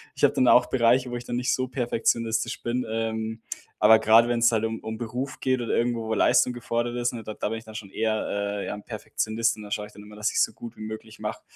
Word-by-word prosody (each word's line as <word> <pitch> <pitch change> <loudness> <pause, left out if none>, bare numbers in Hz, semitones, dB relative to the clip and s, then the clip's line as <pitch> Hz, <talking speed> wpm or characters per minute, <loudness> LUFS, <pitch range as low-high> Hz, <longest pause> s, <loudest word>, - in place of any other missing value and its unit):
ich - - -8
habe - - +6
dann 130 - +2
auch 125 0 +6
Bereiche, 125 +1 +3
wo - - -3
ich 120 - -5
dann 120 - -3
nicht 125 +1 +1
so 130 0 -1
perfektionistisch 115 -2 -1
bin, 120 +2 -1
ähm, 110 0 -3 0.4
aber 110 0 +7
gerade 115 +2 +5
wenn's 120 0 +3
halt 110 -1 +1
um 115 0 -2
um 110 0 -6
Beruf 125 +4 -4
geht 130 -1 +1
oder 115 - -1
irgendwo, 115 -1 0
wo 110 - 0
Leistung 125 +3 +4
gefordert 120 0 -2
ist, 120 0 0
ne, 115 -2 -6
d 110 - -6
da - - -2
bin 115 - -3
ich 115 - -10
dann 110 0 -12
schon 110 -3 -7
eher 110 +1 -1
äh, 100 0 -2
ja, - - -3
'n 105 0 -8
Perfektionist 115 +1 -1
und 105 - -9
da 105 - -11
schaue 105 0 -2
ich - - -18
dann 105 - -12
immer, 105 0 -13
dass 105 +1 -1
ich's - - +3
so - - -2
gut 120 0 -10
wie - - -11
möglich 110 +1 -8
mache. - - -4
115 Hz, 270 wpm, -26 LUFS, 110-120 Hz, 0.4 s, aber